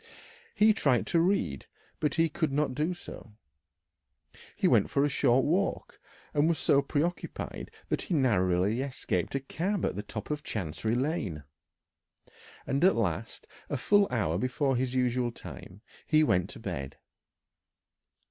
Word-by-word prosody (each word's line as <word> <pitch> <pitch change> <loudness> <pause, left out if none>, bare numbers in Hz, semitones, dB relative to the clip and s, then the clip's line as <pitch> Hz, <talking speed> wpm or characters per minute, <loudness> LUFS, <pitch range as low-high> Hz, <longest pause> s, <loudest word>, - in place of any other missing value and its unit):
He 215 +1 +5
tried 135 - +2
to 170 - +2
read, 170 - 0 0.3
but 150 -2 0
he 165 -1 +3
could 155 -1 -1
not 140 -1 0
do 150 +6 0
so; 120 -9 -11 1.2
he - - +2
went - - +4
for 140 - +2
a - - +1
short 130 -2 +3
walk, 185 +6 -1 0.3
and 150 +2 +3
was 165 - +1
so 140 - +3
preoccupied 150 +5 -3 0.2
that - - 0
he 175 - -2
narrowly 105 - +2
escaped 135 0 -2
a - - +2
cab 175 +8 -2
at - - -1
the 100 - -3
top 105 +4 -7
of 150 0 -2
Chancery 110 - -2
Lane; 120 - -2 1.2
and 140 +3 0
at 190 +1 +6
last 100 0 -2 0.2
a 145 - -1
full 205 +9 +4
hour 95 -9 0
before 130 +2 0
his 130 +1 -1
usual 125 -1 +1
time 100 -3 -11 0.3
he 155 -1 +4
went 90 - +2
to - - -9
bed. 70 0 -5
135 Hz, 150 wpm, -29 LUFS, 110-155 Hz, 1.2 s, at